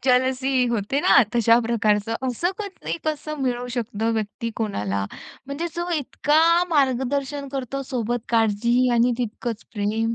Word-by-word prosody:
Jealousy 260 Hz, 0 st, +2 dB
होते 235 Hz, +4 st, 0 dB
ना, -, -, +6 dB
तशा 230 Hz, 0 st, +5 dB
प्रकारचं. 220 Hz, -1 st, +1 dB
असं 295 Hz, +9 st, 0 dB
कधी 405 Hz, -5 st, -5 dB
कसं 305 Hz, 0 st, -3 dB
मिळू 245 Hz, -1 st, -1 dB
शकतं 225 Hz, -1 st, -1 dB
व्यक्ती 220 Hz, +1 st, -3 dB
कोणाला. 100 Hz, -, -2 dB, 0.4 s
म्हणजे 280 Hz, +5 st, -3 dB
जो 345 Hz, +1 st, -2 dB
इतका 295 Hz, +2 st, +1 dB, 0.3 s
मार्गदर्शन 280 Hz, 0 st, 0 dB
करतो. 275 Hz, 0 st, -3 dB
सोबत 240 Hz, -2 st, -2 dB
काळजीही 235 Hz, +2 st, +2 dB
आणि 240 Hz, +1 st, +3 dB
तितकंच 230 Hz, -1 st, -4 dB
प्रेम. 220 Hz, +3 st, 0 dB
245 Hz, 130 wpm, -23 LUFS, 225-275 Hz, 0.4 s, ना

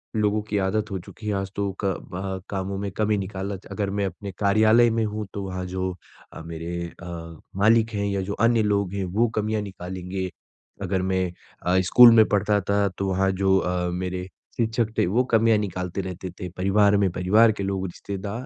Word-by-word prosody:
लोगों 105 Hz, 0 st, +1 dB
की 105 Hz, -, 0 dB
आदत 105 Hz, +2 st, 0 dB
हो 95 Hz, -, -2 dB
चुकी 105 Hz, +5 st, -11 dB
है 105 Hz, -, 0 dB
आज 95 Hz, -1 st, -3 dB
तो 100 Hz, -1 st, -1 dB
क -, -, +1 dB, 0.3 s
वहाँ 95 Hz, +1 st, -4 dB
कामों 95 Hz, 0 st, -3 dB
में 100 Hz, 0 st, -3 dB
कमी 105 Hz, -1 st, +2 dB
निकाला 95 Hz, 0 st, -4 dB, 0.2 s
अगर 100 Hz, 0 st, -2 dB
मैं 100 Hz, 0 st, -1 dB
अपने 95 Hz, +2 st, -6 dB
कार्यालय 110 Hz, +3 st, +5 dB
में 115 Hz, 0 st, 0 dB
हूँ, 105 Hz, 0 st, -3 dB
तो 100 Hz, -, -4 dB
वहाँ 95 Hz, -1 st, -4 dB
जो 95 Hz, 0 st, -3 dB, 0.4 s
अ, -, -, -8 dB
मेरे 85 Hz, +1 st, -5 dB, 0.2 s
अ, -, -, -8 dB, 0.5 s
मालिक 110 Hz, +2 st, +4 dB
हैं 100 Hz, -1 st, -1 dB
या 100 Hz, -1 st, -1 dB
जो 100 Hz, +2 st, -3 dB
अन्य 115 Hz, +1 st, +3 dB
लोग 100 Hz, -2 st, 0 dB
हैं, 100 Hz, -1 st, -2 dB
वो 105 Hz, +7 st, +1 dB
कमियाँ 110 Hz, 0 st, 0 dB
निकालेंगे, 95 Hz, -1 st, -5 dB, 0.5 s
अगर 95 Hz, -1 st, -1 dB
मैं 95 Hz, -1 st, 0 dB, 0.4 s
अ, 90 Hz, +1 st, +4 dB
स्कूल 120 Hz, +6 st, +8 dB
में 110 Hz, -1 st, +7 dB
पढ़ता 105 Hz, 0 st, +2 dB
था 100 Hz, 0 st, +3 dB
तो 100 Hz, -, -1 dB
वहाँ 95 Hz, +1 st, +2 dB
जो 95 Hz, 0 st, +2 dB
अ, 90 Hz, -1 st, -1 dB
मेरे 90 Hz, 0 st, -3 dB, 0.3 s
शिक्षक 115 Hz, -1 st, 0 dB
थे -, -, +3 dB
वो 115 Hz, +8 st, +2 dB
कमियाँ 115 Hz, 0 st, +5 dB
निकालते 95 Hz, -2 st, -3 dB
रहते 95 Hz, 0 st, -6 dB
थे, 90 Hz, +1 st, -7 dB
परिवार 100 Hz, +3 st, +3 dB
में 100 Hz, -1 st, +2 dB
परिवार 105 Hz, +6 st, +4 dB
के 105 Hz, -2 st, -4 dB
लोग 95 Hz, -1 st, -2 dB
रिश्तेदार 100 Hz, +6 st, -6 dB
100 Hz, 200 wpm, -24 LUFS, 95-105 Hz, 0.5 s, स्कूल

